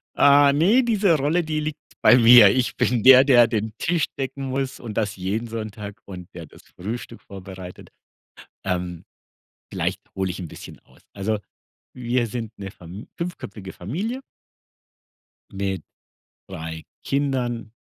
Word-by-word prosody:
Ah, 140 0 +6
ne, 200 - +4
diese 205 -7 +3
Rolle, 155 +6 +1
die 155 -1 -2
liegt 150 0 -4 0.2
bei 125 - +7
mir. 115 -3 +9
Ich 125 -1 0
bin 120 -2 +1
der, 130 +2 +9
der 120 -4 +6
den 110 -2 -2
Tisch 165 -2 +1
decken 135 +1 -4
muss 135 0 -3
und 115 -3 -7
das 105 -2 -1
jeden 100 +5 -3
Sonntag 110 -2 -7
und 90 -3 -9
der 85 -2 -8
das - - -17 0.2
Frühstück 115 +5 -6
vorbereitet. 95 -2 -10 0.7
Ähm, 90 -2 -3 0.7
vielleicht - - -2
hole 95 -1 -1
ich 95 - -8
'n 90 - -5
bisschen - - -11
aus. - - -25
Also 105 +2 -1 0.6
wir 120 -1 0
sind 115 -1 -5
'ne 100 - -6
Fam 90 +3 -11
fünfköpfige 105 - -6
Familie 190 - -4 1.3
mit 95 -3 -3 0.7
3 80 0 -7 0.2
Kindern, 125 -5 -2
115 Hz, 140 wpm, -23 LUFS, 95-135 Hz, 1.3 s, mir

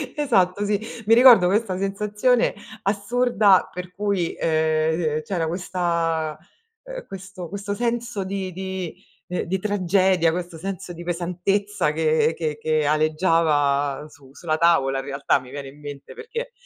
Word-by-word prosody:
Esatto, 205 -9 +1
sì. 205 -1 +1 0.3
Mi 225 - +6
ricordo 240 -7 +8
questa 195 -1 0
sensazione 210 +5 +1 0.3
assurda 210 -1 +2
per 180 0 -8
cui, 200 -4 -1
ehm, 155 0 +1
c'era 170 -5 -2
questa 170 -3 -1 0.5
uhm, - - -8
questo 190 -2 -8
questo 200 +1 -4
senso 235 -2 -2
di 190 -1 -4
di 190 -1 -5 0.3
ehm, 180 - -2
di 190 +3 -1
tragedia, 185 -3 +2
questo 175 -1 -5
senso 185 0 -6
di 170 +1 -9
pesantezza 180 +1 -1
che 160 0 +2
che 155 -2 -2
che 155 -1 0
aleggiava 150 -2 +1
su 135 -2 -18
sulla 155 -1 -2
tavola 135 -6 +3
in - - -6
realtà, 140 0 +1
mi 125 0 -13
viene 140 0 -7
in 145 +2 -16
mente, 145 -1 -9
perché 470 +1 -6
180 Hz, 140 wpm, -23 LUFS, 155-200 Hz, 0.5 s, ricordo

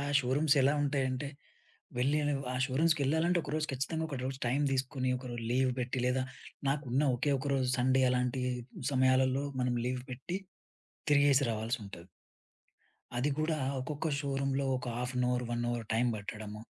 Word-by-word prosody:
ఆ - - -2 0.2
షోరూమ్స్ 140 +4 +2
ఎలా 135 +2 +4
ఉంటాయంటే, 135 -1 0 0.7
వెళ్ళి 140 +5 +2 0.3
ఆ - - -2
షోరూమ్స్‌కెళ్ళాలంటే 160 +4 +2
ఒకరోజు 155 +1 -1
ఖచ్చితంగా 160 +5 -1
ఒకరోజు 130 -2 -4
టైం 135 +4 +1
దీసుకొని, 130 0 0
ఒకరోజు 120 -2 -6
లీవ్ 130 +1 +3
పెట్టి, 125 +1 -2
లేదా 130 +1 +1 0.5
నాకున్న 140 -1 0
ఒకే 140 +3 +1
ఒకరోజు 135 -2 0
సండే. 130 +1 +3
అలాంటి 125 +1 0 0.5
సమయాలలో 130 +1 +3 0.2
మనం 125 -1 +1
లీవ్ 125 0 -1
పెట్టి 135 +9 -4 0.7
తిరిగేసి 140 -1 +5
రావాల్సి 115 +3 -2
ఉంటది. 85 -3 -10 1.1
అది 140 +4 +1
గూడా 155 0 +1 0.2
ఒక్కొక్క 150 +4 -3
షోరూమ్‌లో 140 -1 0
ఒక 125 - -6
half 125 +1 -2
an 125 - +2
hour, 125 0 0
1 120 0 -1
hour 120 -1 -2
time 120 +2 +3
బట్టడము. 105 +1 -7
130 Hz, 145 wpm, -32 LUFS, 125-140 Hz, 1.1 s, తిరిగేసి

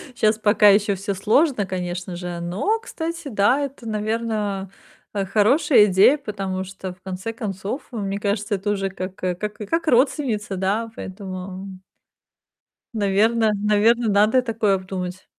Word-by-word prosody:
Щас 215 0 +2
пока 210 -1 +5
ещё 200 0 +3
всё 195 +1 -3
сложно, 220 - +2
конечно 180 -1 -4
же. 175 -1 -5
Но, 190 - -1
кстати, 335 -8 -5
да, 215 +2 +2
это, 275 -4 -6
наверно, 215 -3 -2 0.4
э, 200 -1 -1
хорошая 220 - +4
идея. 200 +8 +5
Потому 195 -7 -4
что, 190 -1 -7
в 180 - -26
конце 190 +3 -5
концов, 210 +3 -5
э, 235 - -6
мне 200 -1 -2
кажется, 205 0 -1
это 200 +2 -2
уже 195 -1 -1
как 185 0 -6
как 180 -2 -3 0.2
как 325 +11 -2
родственница, 250 -6 +1
да? 200 +5 -1
Поэтому 190 0 -7 1.3
Наверно 215 +2 +2
наверно, 210 +3 +3
надо 215 +5 +4
такое 220 -4 +1
обдумать. 185 -1 -5
205 Hz, 140 wpm, -22 LUFS, 190-225 Hz, 1.3 s, пока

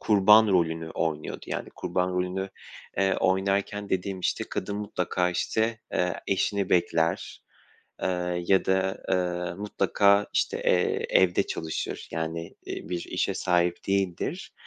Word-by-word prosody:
kurban 105 +1 +6
rolünü 80 -3 +1
oynuyordu. 80 -2 -3
Yani, - - -4
kurban 90 0 -1
rolünü, 90 +1 -2 0.5
eee, 95 0 +2
oynarken 100 +2 0
dediğim, 95 0 -2
işte, - - -1
kadın 100 +2 -3
mutlaka, 90 -3 -1
işte, 110 +5 0
eee, 90 -1 +1
eşini 100 0 0
bekler, 85 -2 +1 0.6
eee, 90 -1 -1
ya 95 0 +4
da, 95 0 0
eee, 90 -1 0
mutlaka, 100 0 +2
işte, - - +1
eee, 90 - +1
evde 90 -2 +4
çalışır. 80 -1 -4
Yani, 80 +1 -4
iii, - - -6
bir 90 -1 -2
işe - - -1
sahip 90 -1 +1
değildir, 100 - -1
90 Hz, 125 wpm, -27 LUFS, 90-100 Hz, 0.6 s, kurban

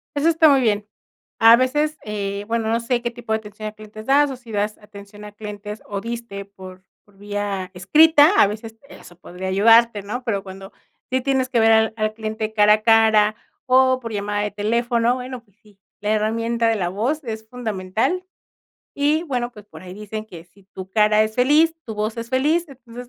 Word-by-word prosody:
Eso 290 +3 +2
está 320 -1 +5
muy 275 -2 +4
bien. 210 -2 0 0.5
A 225 +1 +8
veces, 295 +5 0
eh, 200 -1 -4
bueno, 225 -1 -1
no 230 - +1
sé 235 +1 -1
qué 240 0 -3
tipo 240 -2 -9
de - - +2
atención 215 0 -9
a - - -12
clientes 215 0 -12
das, 285 +2 +3
o - - -5
si 245 -2 -14
das 210 0 -2
atención 205 0 -13
a 210 - -10
clientes 210 0 -8
o 200 -1 -4
diste 230 -4 -6
por 185 -1 -13 0.2
por 200 -1 -26
vía 205 -2 -4
escrita, 305 - +5
a - - +7
veces 220 +2 -8
eso 175 - -15
podría 180 +2 -8
ayudarte, 225 +2 +4
¿no? 245 +5 -5
Pero 200 -5 -2
cuando 195 0 -11 0.4
sí 260 0 +1
tienes 265 -1 0
que 235 - +1
ver 225 0 +4
al 220 0 +3
al 215 0 -1
cliente 220 0 -5
cara 210 -1 +5
a 215 - -8
cara 220 -2 +4 0.3
o 260 0 +4
por 230 -2 -7
llamada 205 0 -2
de 210 - -3
teléfono, 235 +3 0
bueno, 255 -1 -7
pues 205 -1 -34
sí, 210 -2 -24 0.2
la 210 +1 -1
herramienta 230 +2 0
de 225 - +1
la 175 -3 -1
voz 250 - -2
es 220 -2 -7
fundamental 230 - -2 0.7
y, 295 +3 +1
bueno, 245 -5 -3
pues 210 -3 -14
por - - -13
ahí 180 0 -10
dicen 215 +1 -7
que 170 -5 -12
si 185 +3 -25
tu 190 0 -10
cara 210 +1 +3
es 220 0 -3
feliz, 300 +6 +3
tu 220 - -6
voz 215 +2 -3
es 230 - -6
feliz, 305 +7 +1
entonces, 245 -2 -12
220 Hz, 205 wpm, -21 LUFS, 205-245 Hz, 0.7 s, A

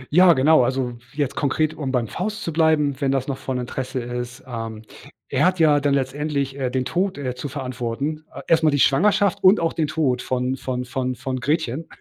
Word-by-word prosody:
Ja, 180 -1 +8
genau, 140 0 +5
also 130 0 -1 0.2
jetzt 145 -2 -1
konkret, 155 +2 0
um 140 -4 -4
beim 125 -3 0
Faust 205 - -4
zu 165 - -3
bleiben, 150 -3 +2
wenn 135 -1 +2
das 135 -1 -1
noch 135 -2 -3
von 130 -1 -3
Interesse 125 +1 -4
ist, 120 +1 -6
ähm 115 -3 -6 0.5
er - - +1
hat 185 0 +1
ja 150 -3 +5
dann 140 -1 +1
letztendlich, 140 0 -2
äh, 130 -2 0
den 130 0 -1
Tod, 185 +4 -1
äh, 130 -3 -3
zu 125 +3 -6
verantworten. 135 +3 -4
A - - -10
erst 165 -1 +4
mal 155 - +5
die 145 - +1
Schwangerschaft 200 +8 +3
und 190 +3 +6
auch 165 -1 0
den 160 -2 0
Tod 140 -5 0
von 130 0 -1
von 125 -1 -3
von 130 0 -2
von 130 +1 -4
Gretchen. 150 +1 -1
135 Hz, 210 wpm, -22 LUFS, 125-155 Hz, 0.5 s, Ja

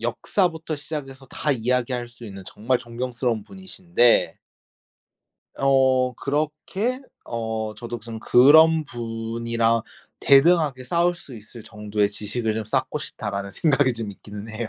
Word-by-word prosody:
역사부터 160 - -1
시작해서 140 -3 -7
다 150 - -2
이야기할 125 0 0
수 120 0 -13
있는 95 -2 -9
정말 120 +6 -1
존경스러운 120 -1 -3
분이신데 180 - +1 1.2
어 130 -2 +3
그렇게 155 - -2 0.2
어 110 -2 -4
저도 120 +2 -6
무슨 115 0 -8
'그런 155 +7 +6
분이랑 115 -1 -1 0.4
대등하게 140 -2 +4
싸울 170 +5 +1
수 145 -7 -12
있을 110 +1 -11
정도의 105 -1 -2
지식을 110 +2 -2
좀 110 0 -3
쌓고 130 +6 -1
싶다.'라는 100 -8 -5
생각이 140 0 +2
좀 115 -3 -5
있기는 105 +2 -10
해요. 110 +1 -4
120 Hz, 295 characters per minute, -23 LUFS, 110-145 Hz, 1.2 s, 그런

